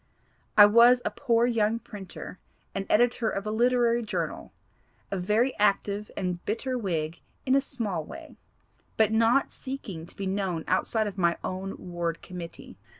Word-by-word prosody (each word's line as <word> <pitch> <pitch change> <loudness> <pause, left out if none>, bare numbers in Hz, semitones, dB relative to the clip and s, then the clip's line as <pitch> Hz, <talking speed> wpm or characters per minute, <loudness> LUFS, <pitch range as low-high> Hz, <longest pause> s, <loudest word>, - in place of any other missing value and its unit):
I 205 - +11
was 235 +4 +6
a - - 0
poor 235 -4 +2
young 225 -2 +1
printer, 195 -4 -9 0.3
and 195 0 -3
editor 240 0 +3
of 195 - -4
a 215 - -2
literary 240 +1 +3
journal 220 - -4 0.6
a 195 - -1
very 215 +8 +1
active 205 0 +1
and 180 -2 -2
bitter 255 +5 -2
Whig 170 -8 -2 0.3
in 260 - +2
a 275 - +5
small 220 - -3
way, 325 - -11 0.6
but 220 -1 +4
not 230 +4 +3
seeking 195 -11 -7
to - - -15
be 195 - -4
known 190 -4 -1
outside 215 +4 +1
of 200 -2 -5
my 170 -1 +2
own 190 +1 -4
ward 170 -2 -4
committee. 175 -2 -9
210 Hz, 155 wpm, -27 LUFS, 185-235 Hz, 0.6 s, I